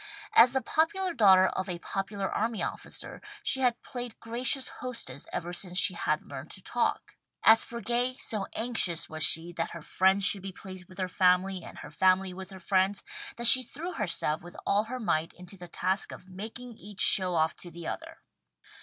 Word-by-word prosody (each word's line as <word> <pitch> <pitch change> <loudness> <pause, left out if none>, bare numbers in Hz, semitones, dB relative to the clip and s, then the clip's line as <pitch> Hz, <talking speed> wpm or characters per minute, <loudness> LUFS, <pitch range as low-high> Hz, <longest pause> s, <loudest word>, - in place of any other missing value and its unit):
As 240 +2 +6
the 265 - -1
popular 360 +3 0
daughter 190 - +5
of 190 +1 -3
a 175 - -4
popular 195 +2 -5
army 225 0 -3
officer, - - -6 0.2
she 265 - +3
had 245 -2 0
played 245 -3 -8
gracious 250 +3 0
hostess 230 - -5
ever 175 +1 -5
since 180 0 -2
she 195 0 +4
had 155 -3 -2
learned 140 +2 -10
to 190 - -11
talk. 240 - -3 0.3
As 225 0 +6
for 235 0 -8
Gay, 240 +3 -1
so 215 -6 -5
anxious 220 -8 0
was 155 0 -7
she 165 +2 +1
that 165 - -2
her 170 - -9
friends 190 +3 +2
should 200 -1 +6
be 195 0 -7
pleased 185 -1 -10
with 185 - -15
her 185 -1 -2
family 185 0 +1
and - - -12
her - - -11
family 185 +3 +1
with 190 +1 -10
her 190 -1 -11
friends, 190 +2 0 0.3
that 235 - -4
she 245 +2 +12
threw 320 +8 -7
herself 170 - -1
with 175 +1 -13
all 205 +2 +1
her 255 +3 -6
might 165 -7 -2
into 180 +2 -13
the 175 -2 -12
task 190 +3 -2
of 185 - -12
making 220 +5 -9
each 205 -1 -11
show 185 -2 +7
off 160 0 0
to 175 - -8
the 170 0 -11
other. - - -8
195 Hz, 200 wpm, -28 LUFS, 180-235 Hz, 0.3 s, she